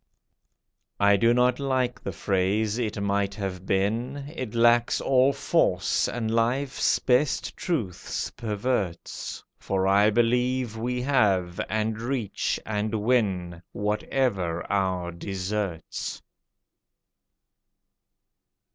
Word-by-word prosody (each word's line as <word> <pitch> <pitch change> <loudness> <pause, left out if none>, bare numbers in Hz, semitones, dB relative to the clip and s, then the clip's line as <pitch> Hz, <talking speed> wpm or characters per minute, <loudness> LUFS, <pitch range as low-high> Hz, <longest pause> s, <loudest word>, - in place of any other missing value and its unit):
I 100 0 +5
do 115 +4 +4
not 125 +1 +3
like 130 -3 0
the - - -4
phrase, 100 +3 0
"It 110 -3 -2
might 100 0 0
have 95 -2 -5
been!" 120 +9 -1
It 125 -6 -5
lacks 120 0 +4
all 130 0 +4
force, - - +1
and 115 -2 -2
life's 125 +4 +1
best 130 +3 +1
truths 120 - -3
perverts 105 -5 -3 0.2
For 95 -1 -1
I 100 +2 +5
believe 125 +1 +1
we 125 +2 -2
have, 100 -8 +2
and 110 +1 -1
reach, 120 -4 -2
and 110 0 -2
win, 100 -7 0
Whatever 105 -4 -1
our 95 -3 0
deserts. 95 -1 -4
110 Hz, 100 wpm, -26 LUFS, 100-125 Hz, 0.2 s, I